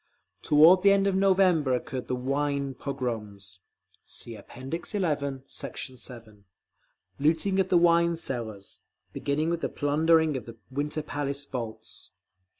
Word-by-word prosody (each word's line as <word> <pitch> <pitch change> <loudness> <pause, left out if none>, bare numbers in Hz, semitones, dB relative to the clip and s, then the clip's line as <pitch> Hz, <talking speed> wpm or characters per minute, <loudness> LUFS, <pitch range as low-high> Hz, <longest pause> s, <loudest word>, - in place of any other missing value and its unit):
Toward 160 +5 +6
the 200 +1 +6
end 195 0 +3
of 195 - +2
November 185 -8 +3
occurred 125 0 -5
the 125 - -1
"wine 140 +1 -1
pogroms" 105 -9 -5 0.4
(See 115 - -8
App. - - -14
XI, 135 +7 -5
Sect. - - -7
7)—looting 135 - -4
of 190 -1 +1
the 180 - +5
wine 170 0 +4
cellars—beginning 130 +5 -4
with 170 -1 -2
the - - -1
plundering 160 +1 +2
of 125 -4 -5
the 115 0 -10
Winter 150 +3 -2
Palace 145 -1 -3
vaults. 115 -5 -7
140 Hz, 125 wpm, -27 LUFS, 125-165 Hz, 0.4 s, Toward